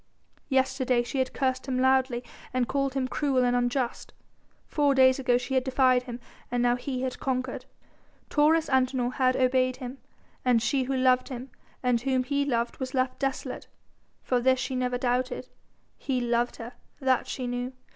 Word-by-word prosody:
Yesterday 265 Hz, -2 st, +2 dB
she 265 Hz, +3 st, -3 dB
had 260 Hz, -, 0 dB
cursed 260 Hz, 0 st, -1 dB
him 260 Hz, -1 st, -1 dB
loudly 260 Hz, -1 st, +2 dB, 0.3 s
and 250 Hz, -2 st, +1 dB
called 275 Hz, -1 st, -1 dB
him 260 Hz, -1 st, 0 dB
cruel 265 Hz, -2 st, +1 dB
and 245 Hz, 0 st, +2 dB
unjust, 245 Hz, 0 st, -1 dB, 0.5 s
four 285 Hz, -2 st, +2 dB
days 260 Hz, 0 st, +5 dB
ago 250 Hz, -2 st, +3 dB
she 250 Hz, +2 st, -4 dB
had 260 Hz, -1 st, +2 dB
defied 255 Hz, -1 st, +3 dB
him 245 Hz, -1 st, -7 dB, 0.3 s
and 245 Hz, 0 st, 0 dB
now 245 Hz, 0 st, +3 dB
he 255 Hz, 0 st, -4 dB
had 255 Hz, -1 st, -3 dB
conquered. 255 Hz, -1 st, -2 dB, 0.6 s
Taurus 315 Hz, +2 st, +3 dB
Antinor 255 Hz, -2 st, +1 dB
had 255 Hz, -1 st, +2 dB
obeyed 255 Hz, 0 st, +2 dB
him 255 Hz, +1 st, -8 dB, 0.4 s
and 250 Hz, -2 st, +4 dB
she 255 Hz, +3 st, 0 dB
who 265 Hz, +1 st, -1 dB
loved 255 Hz, 0 st, +3 dB
him 255 Hz, 0 st, -7 dB, 0.3 s
and 245 Hz, -2 st, +2 dB
whom 260 Hz, 0 st, +1 dB
he 280 Hz, +2 st, 0 dB
loved 235 Hz, -3 st, -1 dB
was 260 Hz, +1 st, -4 dB
left 255 Hz, 0 st, 0 dB
desolate. 270 Hz, -1 st, -3 dB, 0.6 s
For 250 Hz, -, +1 dB
this 260 Hz, +1 st, +3 dB
she 260 Hz, -, -3 dB
never 250 Hz, -1 st, 0 dB
doubted: 250 Hz, 0 st, -1 dB, 0.5 s
he 260 Hz, -2 st, -1 dB
loved 240 Hz, 0 st, 0 dB
her, 235 Hz, +2 st, -8 dB, 0.3 s
that 260 Hz, -3 st, +1 dB
she 255 Hz, -, -4 dB
knew. 245 Hz, +1 st, -3 dB
255 Hz, 175 wpm, -27 LUFS, 245-265 Hz, 0.6 s, days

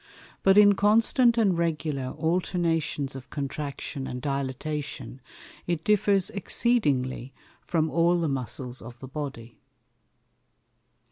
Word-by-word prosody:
But 195 Hz, +1 st, +5 dB
in 205 Hz, -1 st, +8 dB
constant 230 Hz, +4 st, +3 dB
and 200 Hz, -6 st, +3 dB
regular 155 Hz, -5 st, -1 dB
Alternations 165 Hz, -3 st, -1 dB
of 130 Hz, -1 st, -9 dB
Contraction 140 Hz, -1 st, -5 dB
and 125 Hz, -, -5 dB
Dilatation, 140 Hz, -1 st, -4 dB, 0.5 s
it 170 Hz, -2 st, -1 dB
differs 205 Hz, -2 st, +2 dB
exceedingly 140 Hz, -, 0 dB, 0.3 s
from 160 Hz, -2 st, 0 dB
all 170 Hz, +1 st, +3 dB
the 165 Hz, -, 0 dB
Muscles 130 Hz, -1 st, -4 dB
of 120 Hz, +2 st, -11 dB
the 130 Hz, -, -8 dB
Body. 135 Hz, -5 st, -7 dB
150 Hz, 110 wpm, -26 LUFS, 135-180 Hz, 0.5 s, in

